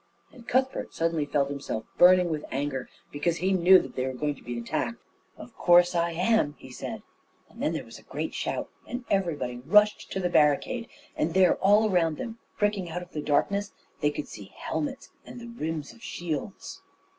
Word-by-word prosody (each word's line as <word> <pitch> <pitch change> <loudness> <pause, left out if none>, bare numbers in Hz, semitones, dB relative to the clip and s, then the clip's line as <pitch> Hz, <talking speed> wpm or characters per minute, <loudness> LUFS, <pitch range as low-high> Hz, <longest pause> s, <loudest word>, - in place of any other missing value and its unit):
And 240 -3 -15
Cuthbert 260 +1 0
suddenly 165 -3 0
felt 140 -1 +1
himself 140 -6 -4
burning 180 -1 +7
with 150 -1 -2
anger, 135 -1 -3 0.2
because 160 +4 0
he 185 +3 +1
knew 185 +1 +7
that - - -3
they 130 - -1
were 130 - -3
going 150 +3 -1
to - - -17
be 120 -1 -5
attacked. 115 0 -2 0.4
"Of - - -12
course 175 0 +5
I 170 0 +1
am," 180 -4 +2
he 130 - -12
said, 220 - -6 0.4
and - - -13
then - - +1
there - - -4
was - - -11
a - - -17
great - - -5
shout, - - -2 0.2
and 245 0 -5
everybody 155 -11 0
rushed 210 +12 +3
to - - -1
the 180 - +1
barricade; 175 - +2 0.3
and 165 +2 -1
there 190 -1 +6
all 210 +2 +4
round 165 -4 +2
them, 230 -1 -6 0.2
pricking 205 -4 0
out 180 +2 -4
of 175 - -16
the 150 - -4
darkness, 200 +8 0 0.3
they 150 - +2
could 150 0 -5
see 100 -1 -10
helmets 275 -2 -4
and - - -10
the 235 - -9
rims 160 -10 -4
of 235 - -19
shields. 175 - -5
175 Hz, 195 wpm, -27 LUFS, 145-205 Hz, 0.4 s, burning